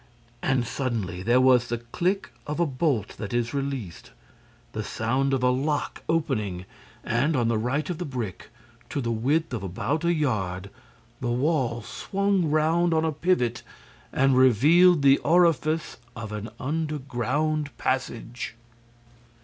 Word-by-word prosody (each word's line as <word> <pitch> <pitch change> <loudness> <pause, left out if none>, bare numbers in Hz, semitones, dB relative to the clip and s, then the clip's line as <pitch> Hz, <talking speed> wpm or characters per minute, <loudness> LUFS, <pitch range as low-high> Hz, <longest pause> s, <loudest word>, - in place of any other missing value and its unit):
And, 130 -2 +1
suddenly, 115 -9 -3
there 120 +6 +3
was 130 -2 +5
the 120 - -2
click 175 - -2
of 150 +2 -3
a 170 - +4
bolt 135 - 0
that 105 +2 -4
is 120 +1 0
released, 135 -10 -4 0.6
the 110 - -4
sound 125 +7 0
of 135 -2 0
a 125 - +4
lock 145 +4 -1
opening 110 - -1 0.4
and, 140 +7 +1
on 120 -3 +2
the 115 - +1
right 140 +6 -1
of 175 -3 -4
the - - -2
brick, 120 - -5 0.4
to - - -2
the 120 -3 -1
width 135 +7 0
of 115 - -2
about 110 - -2
a 170 - +3
yard, 100 - -1 0.5
the 120 - -2
wall 125 -2 0
swung 195 - 0
round 160 +3 +2
on 160 0 +2
a 160 - +1
pivot 140 -7 0 0.5
and 135 0 +3
revealed 145 - +5
the 135 0 +6
orifice 165 -1 +2 0.2
of 110 -1 -6
an 105 +1 -5
underground 150 0 -1
passage. 120 -2 -3
130 Hz, 145 wpm, -26 LUFS, 115-155 Hz, 0.6 s, the